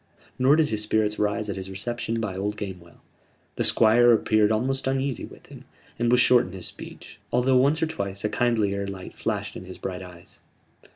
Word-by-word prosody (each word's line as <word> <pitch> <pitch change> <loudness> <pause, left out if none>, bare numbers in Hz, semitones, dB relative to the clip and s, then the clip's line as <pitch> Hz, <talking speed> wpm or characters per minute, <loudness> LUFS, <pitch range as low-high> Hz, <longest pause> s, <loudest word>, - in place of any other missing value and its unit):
Nor 130 +3 +5
did 155 -1 +2
his 110 -1 -1
spirits 105 0 0
rise 105 +1 0
at - - -3
his 95 0 -6
reception 115 +3 -3
by 105 -4 -3
old 105 +2 -3
Gamewell. 90 -5 -8 0.5
The - - -1
Squire 120 +2 +5
appeared 110 -1 +3
almost 130 +5 -1
uneasy 135 -1 -1
with - - -15
him; - - -13 0.4
and 120 0 +2
was 125 - +5
short 120 -3 +5
in 90 - -11
his 95 -3 -7
speech, - - -9
although 125 +1 +3
once 140 +5 +3
or - - +4
twice 100 -11 -5
a - - +2
kindlier 105 -5 0
light 95 -1 -8
flashed - - -3
in - - -8
his 95 - -10
bright 90 -1 -5
eyes. 90 -2 -13
110 Hz, 195 wpm, -25 LUFS, 100-125 Hz, 0.5 s, Nor